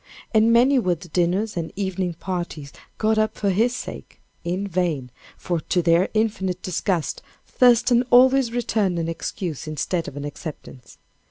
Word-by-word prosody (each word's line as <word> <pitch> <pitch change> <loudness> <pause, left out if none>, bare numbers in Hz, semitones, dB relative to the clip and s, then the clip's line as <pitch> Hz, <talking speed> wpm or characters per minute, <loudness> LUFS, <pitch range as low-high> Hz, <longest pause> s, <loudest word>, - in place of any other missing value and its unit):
And 220 +1 +4
many 255 +4 +5
were 185 -6 +1
the 175 +2 -13
dinners 185 +6 0
and 165 -2 -3
evening 190 -3 -2
parties 170 -5 -5 0.2
got 220 0 +2
up 215 0 0
for 200 -2 +1
his 230 +6 +1
sake, - - -8 0.2
in 180 +4 -2
vain, 165 -9 -1 0.3
for 175 -2 -2
to 175 +3 -1
their 170 +3 +3
infinite 190 -4 -1
disgust, 180 -2 -1 0.2
Thurston 245 -1 +4
always 255 0 +5
returned 215 -6 0
an 165 -1 -1
excuse 165 -1 -4
instead 160 +3 -2
of 140 - -8
an 145 - -5
acceptance. 145 -3 -9
185 Hz, 155 wpm, -23 LUFS, 170-220 Hz, 0.3 s, many